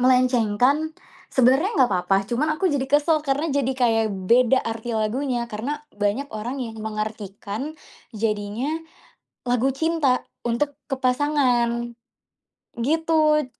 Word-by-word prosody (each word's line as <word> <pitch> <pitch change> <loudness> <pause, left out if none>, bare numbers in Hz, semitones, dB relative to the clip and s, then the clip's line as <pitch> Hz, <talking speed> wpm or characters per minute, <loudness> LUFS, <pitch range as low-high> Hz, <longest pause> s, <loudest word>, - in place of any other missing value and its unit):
melenceng 250 -4 +3
kan, 295 +7 +2 0.3
sebenarnya 265 - +3
gak - - -2
apa-apa 185 +2 +2
cuma 245 +8 -1
aku 370 -1 +1
jadi 270 -2 0
kesel 300 +2 +3
karena 285 +3 0
jadi 275 -2 +1
kayak 225 -3 +2 0.2
beda 250 +2 +5
arti 225 0 -3
lagunya 240 +3 -1
karena 270 +8 -4
banyak 205 +7 -1
orang 230 +5 -4
yang 225 -2 -7
mengartikan 215 +4 -5 0.4
jadinya 215 +4 -2 0.8
lagu 245 +2 +2
cinta 290 -2 +1 0.2
untuk 240 +5 0 0.2
ke 270 - 0
pasangan, 250 -3 +1 0.8
gitu. 305 +2 +2
250 Hz, 120 wpm, -23 LUFS, 225-285 Hz, 0.8 s, beda